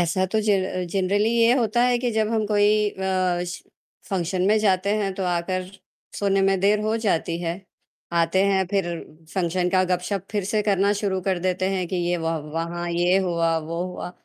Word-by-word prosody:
ऐसा 175 Hz, +2 st, +1 dB
तो 220 Hz, -, +1 dB
ज 205 Hz, -, +4 dB, 0.4 s
जनरली 200 Hz, +3 st, +1 dB
ये 235 Hz, 0 st, +4 dB
होता 235 Hz, 0 st, +1 dB
है 245 Hz, -1 st, +2 dB
कि 245 Hz, -, +2 dB
जब 215 Hz, -1 st, +1 dB
हम 215 Hz, -1 st, 0 dB
कोई 205 Hz, 0 st, +3 dB, 0.2 s
अ, 185 Hz, -2 st, -1 dB
श 175 Hz, 0 st, -7 dB, 0.5 s
फंक्शन 180 Hz, -1 st, -1 dB
में 215 Hz, -, +4 dB
जाते 195 Hz, -1 st, +2 dB
हैं 200 Hz, -2 st, -1 dB
तो -, -, -1 dB
आकर 180 Hz, +1 st, -1 dB, 0.5 s
सोने 195 Hz, -1 st, +2 dB
में 195 Hz, -, +2 dB
देर 205 Hz, +2 st, +3 dB
हो 215 Hz, +1 st, 0 dB
जाती 170 Hz, -4 st, 0 dB
है, 165 Hz, 0 st, -1 dB, 0.6 s
आते 170 Hz, +3 st, +2 dB
हैं 190 Hz, -2 st, +2 dB
फिर 195 Hz, -3 st, +1 dB, 0.5 s
फंक्शन 180 Hz, -1 st, 0 dB
का 185 Hz, -, +5 dB
गप-शप 180 Hz, +2 st, -1 dB
फिर 205 Hz, -2 st, -1 dB
से 215 Hz, -1 st, +2 dB
करना 200 Hz, 0 st, +2 dB
शुरू 190 Hz, -3 st, -1 dB
कर 185 Hz, -2 st, +1 dB
देते 185 Hz, +1 st, 0 dB
हैं 185 Hz, -1 st, -1 dB
कि 185 Hz, -, -2 dB
ये 175 Hz, -, +1 dB
व 165 Hz, -, -4 dB, 0.3 s
वहाँ 175 Hz, +1 st, -3 dB
ये 175 Hz, +2 st, +2 dB
हुआ, 170 Hz, -3 st, +1 dB
वो 165 Hz, +2 st, -4 dB
हुआ। 180 Hz, -1 st, -6 dB
190 Hz, 195 wpm, -23 LUFS, 175-205 Hz, 0.6 s, का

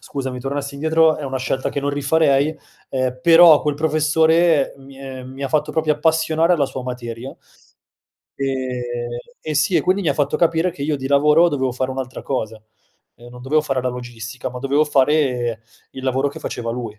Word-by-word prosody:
scusami, 130 Hz, -2 st, -5 dB
tornassi 140 Hz, +1 st, -4 dB
indietro 160 Hz, +2 st, +3 dB
è 150 Hz, -, -6 dB
una 135 Hz, -1 st, -3 dB
scelta 130 Hz, +1 st, -2 dB
che 140 Hz, -, -3 dB
non 145 Hz, +1 st, -1 dB
rifarei, 145 Hz, +1 st, +2 dB, 0.4 s
ehm, 130 Hz, -1 st, -2 dB
però 165 Hz, -2 st, +7 dB
quel 150 Hz, -1 st, 0 dB
professore 160 Hz, 0 st, +2 dB
mi 135 Hz, 0 st, -15 dB
è 135 Hz, -1 st, -8 dB
mi 130 Hz, +2 st, -9 dB
ha 135 Hz, -, -2 dB
fatto 150 Hz, +2 st, 0 dB
proprio 155 Hz, -1 st, +1 dB
appassionare 160 Hz, +2 st, +2 dB
alla 150 Hz, -5 st, +2 dB
sua 130 Hz, -1 st, -6 dB
materia. 125 Hz, 0 st, -6 dB, 1.0 s
Ehm, 125 Hz, -3 st, -3 dB, 0.2 s
eh 155 Hz, -, -4 dB
sì, 150 Hz, +5 st, +1 dB
e -, -, +4 dB
quindi 190 Hz, +2 st, +1 dB
mi 170 Hz, -, 0 dB
ha 140 Hz, -, +1 dB
fatto 145 Hz, -1 st, 0 dB
capire 170 Hz, +1 st, +2 dB
che 150 Hz, -5 st, -9 dB
io 150 Hz, 0 st, 0 dB
di 135 Hz, -1 st, -5 dB
lavoro 150 Hz, +4 st, +4 dB
dovevo 130 Hz, -4 st, -1 dB
fare 130 Hz, +1 st, -2 dB
un'altra 130 Hz, -1 st, -6 dB
cosa, 110 Hz, -5 st, -4 dB, 0.5 s
ehm, 120 Hz, +3 st, -15 dB
non 125 Hz, 0 st, -12 dB
dovevo 150 Hz, +4 st, +2 dB
fare 135 Hz, -4 st, -2 dB
la 130 Hz, -, 0 dB
logistica, 125 Hz, 0 st, -7 dB
ma 125 Hz, -, -7 dB
dovevo 140 Hz, +4 st, +1 dB
fare 130 Hz, -5 st, +1 dB, 0.3 s
il 130 Hz, -, -9 dB
lavoro 130 Hz, +2 st, +1 dB
che 140 Hz, -, -9 dB
faceva 115 Hz, -1 st, -4 dB
lui. 115 Hz, -3 st, -6 dB
140 Hz, 190 wpm, -20 LUFS, 130-155 Hz, 1.0 s, però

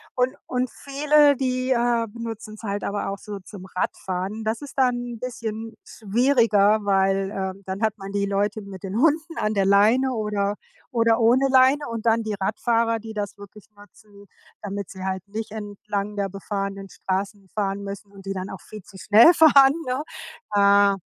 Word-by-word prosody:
und 255 Hz, +2 st, +1 dB
und 250 Hz, 0 st, -1 dB
viele, 290 Hz, +1 st, +3 dB
die, 255 Hz, -1 st, -1 dB
äh, 235 Hz, -1 st, +2 dB
benutzen's 225 Hz, -1 st, -8 dB
halt 205 Hz, -2 st, -3 dB
aber 200 Hz, -1 st, -2 dB
auch 195 Hz, -, -4 dB
so 205 Hz, -1 st, -8 dB
zum 185 Hz, 0 st, -11 dB
Radfahren. 190 Hz, +3 st, -3 dB
Das 220 Hz, +1 st, -2 dB
ist 285 Hz, -, -9 dB
dann 255 Hz, -2 st, +3 dB, 0.2 s
'n -, -, -12 dB
bisschen 225 Hz, -2 st, -5 dB
schwieriger, 220 Hz, -2 st, +2 dB
weil, 195 Hz, 0 st, +1 dB
äh, 190 Hz, -1 st, -3 dB
dann 190 Hz, +3 st, -5 dB
hat 220 Hz, -1 st, 0 dB
man 195 Hz, -1 st, -8 dB
die 200 Hz, 0 st, 0 dB
Leute 200 Hz, +2 st, -1 dB
mit 195 Hz, -2 st, -10 dB
den 195 Hz, +2 st, -4 dB
Hunden 325 Hz, +3 st, +1 dB
an 215 Hz, 0 st, 0 dB
der 195 Hz, -2 st, +1 dB
Leine 220 Hz, +7 st, +4 dB
oder 210 Hz, -2 st, -1 dB, 0.4 s
oder 230 Hz, -1 st, +2 dB
ohne 250 Hz, +4 st, +4 dB
Leine 265 Hz, +3 st, +4 dB
und 230 Hz, -1 st, -5 dB
dann 230 Hz, 0 st, +3 dB
die 215 Hz, -, -3 dB
Radfahrer, 230 Hz, +3 st, 0 dB
die 220 Hz, 0 st, -9 dB
das 205 Hz, -1 st, -4 dB
wirklich 205 Hz, +1 st, -13 dB
nutzen, 205 Hz, 0 st, -18 dB, 0.4 s
damit 200 Hz, -2 st, -5 dB
sie 190 Hz, -1 st, -8 dB
halt 190 Hz, -1 st, -3 dB
nicht 215 Hz, 0 st, -5 dB
entlang 205 Hz, -1 st, -5 dB
der 200 Hz, -1 st, 0 dB
befahrenen 195 Hz, 0 st, -5 dB
Straßen 195 Hz, +2 st, -4 dB
fahren 200 Hz, -1 st, -1 dB
müssen 200 Hz, +1 st, -8 dB
und 195 Hz, -1 st, -14 dB
die 195 Hz, -, -3 dB
dann 185 Hz, 0 st, -5 dB
auch 190 Hz, -, -8 dB
viel 215 Hz, -2 st, -11 dB
zu 195 Hz, -, -15 dB
schnell 220 Hz, -, +7 dB
fahren, 280 Hz, -4 st, +7 dB
ne? 255 Hz, +3 st, -1 dB, 0.5 s
Äh, 200 Hz, 0 st, +5 dB
210 Hz, 180 wpm, -23 LUFS, 200-235 Hz, 0.5 s, schnell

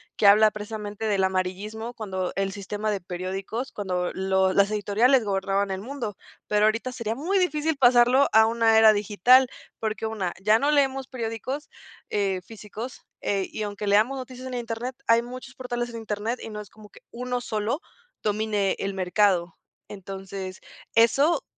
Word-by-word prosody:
que -, -, 0 dB
habla 215 Hz, +2 st, +7 dB
precisamente, 210 Hz, 0 st, -6 dB
del 200 Hz, -3 st, +1 dB
amarillismo. 190 Hz, +5 st, -2 dB
Cuando 190 Hz, -5 st, -3 dB
el 195 Hz, 0 st, -1 dB
sistema 205 Hz, +2 st, -4 dB
de 200 Hz, -2 st, -2 dB
periódicos, 190 Hz, +8 st, -4 dB
cuando 180 Hz, -3 st, -2 dB
los 190 Hz, 0 st, +1 dB
las 200 Hz, +1 st, +4 dB
editoriales 220 Hz, +4 st, +3 dB
gobernaban 195 Hz, 0 st, 0 dB
el 190 Hz, -, -3 dB
mundo. 235 Hz, -3 st, -5 dB, 0.3 s
Pero 210 Hz, 0 st, +3 dB
ahorita, 230 Hz, +4 st, 0 dB
sería 230 Hz, -3 st, -3 dB
muy 355 Hz, +9 st, 0 dB
difícil, 315 Hz, -3 st, 0 dB
pasarlo 250 Hz, +1 st, +5 dB
a 220 Hz, 0 st, +7 dB
una 225 Hz, -1 st, +3 dB
era 220 Hz, -1 st, +8 dB
digital, 215 Hz, +5 st, +4 dB, 0.3 s
porque 220 Hz, 0 st, -3 dB
1, 210 Hz, -5 st, -2 dB
ya 210 Hz, +3 st, +5 dB
no 290 Hz, +2 st, +2 dB
leemos 270 Hz, -2 st, +1 dB
periódicos, 255 Hz, +4 st, -5 dB, 0.4 s
eh, 195 Hz, -3 st, 0 dB
físicos. 220 Hz, +4 st, -8 dB, 0.2 s
Eh, 195 Hz, -2 st, -1 dB
y 215 Hz, -, -4 dB
aunque 205 Hz, 0 st, -5 dB
leamos 215 Hz, +7 st, +3 dB
noticias 255 Hz, 0 st, -8 dB
en 255 Hz, -, -6 dB
internet, 240 Hz, +1 st, -4 dB
hay 230 Hz, 0 st, +5 dB
muchos 250 Hz, +1 st, -9 dB
portales 240 Hz, -1 st, -3 dB
en 235 Hz, -, -7 dB
internet, 220 Hz, +2 st, -3 dB
y -, -, -7 dB
no 210 Hz, 0 st, -6 dB
es 205 Hz, -, -12 dB
como 215 Hz, -1 st, -16 dB
que, -, -, -17 dB
1 250 Hz, +1 st, -3 dB
sólo, 220 Hz, +4 st, -2 dB, 0.4 s
domine 210 Hz, -2 st, 0 dB
el 195 Hz, 0 st, -2 dB
mercado. 185 Hz, -2 st, +1 dB, 0.3 s
Entonces, 195 Hz, -1 st, -7 dB, 0.3 s
eso 275 Hz, +8 st, +4 dB
215 Hz, 165 wpm, -25 LUFS, 200-245 Hz, 0.4 s, era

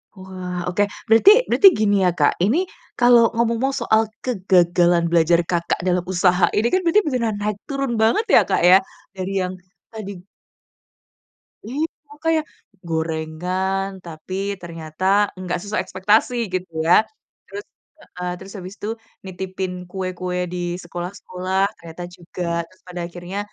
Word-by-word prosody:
Wah 185 Hz, -2 st, -6 dB
oke, 180 Hz, +3 st, +1 dB, 0.2 s
berarti 225 Hz, -, +7 dB, 0.2 s
berarti 400 Hz, -, +6 dB
gini 205 Hz, -, +2 dB
ya, 180 Hz, -, +4 dB
Kak, 150 Hz, -4 st, +2 dB
ini 305 Hz, -, +2 dB, 0.3 s
kalau 240 Hz, -1 st, +6 dB
ngomong 235 Hz, +3 st, 0 dB
soal 220 Hz, -5 st, +2 dB, 0.2 s
kegagalan 175 Hz, -6 st, +2 dB
belajar, 170 Hz, 0 st, +3 dB
Kakak, 170 Hz, -1 st, -1 dB
dalam 180 Hz, -1 st, +1 dB
usaha 180 Hz, 0 st, +2 dB
ini 215 Hz, +3 st, +2 dB
kan 370 Hz, +9 st, +1 dB
benar-benar 300 Hz, -, +2 dB
naik 210 Hz, 0 st, -2 dB
turun 275 Hz, -4 st, -2 dB
banget 225 Hz, -, +2 dB
ya, 235 Hz, -, +6 dB
Kak, -, -, 0 dB
ya 180 Hz, +2 st, +7 dB, 0.4 s
dari 190 Hz, 0 st, -4 dB
yang 185 Hz, 0 st, -2 dB, 0.3 s
tadi 215 Hz, -3 st, -7 dB, 1.6 s
Iya 285 Hz, +7 st, -1 dB, 0.4 s
kayak, 320 Hz, -1 st, +2 dB, 0.4 s
gorengan, 165 Hz, +4 st, -2 dB, 0.2 s
tapi 165 Hz, +2 st, -9 dB, 0.3 s
ternyata 165 Hz, 0 st, -7 dB, 0.3 s
nggak 180 Hz, -1 st, -3 dB
sesuai 205 Hz, 0 st, -2 dB
ekspektasi 210 Hz, +6 st, +2 dB, 0.2 s
gitu 185 Hz, -1 st, -3 dB
ya 180 Hz, +6 st, +5 dB, 0.4 s
terus, 410 Hz, +1 st, -8 dB, 0.5 s
eee, 180 Hz, 0 st, -3 dB
terus 195 Hz, +1 st, -10 dB
habis 185 Hz, 0 st, -8 dB
itu 210 Hz, -, -5 dB, 0.4 s
nitipin 185 Hz, -1 st, -5 dB
kue-kue 185 Hz, -1 st, -3 dB
di 180 Hz, -, -5 dB, 0.3 s
sekolah-sekolah 185 Hz, +1 st, -4 dB, 0.2 s
ternyata 165 Hz, +1 st, -9 dB
juga, 175 Hz, +1 st, -7 dB, 0.2 s
terus 185 Hz, +3 st, -26 dB
pada 180 Hz, -1 st, -6 dB
akhirnya, 175 Hz, +3 st, -6 dB
185 Hz, 135 wpm, -21 LUFS, 175-220 Hz, 1.6 s, berarti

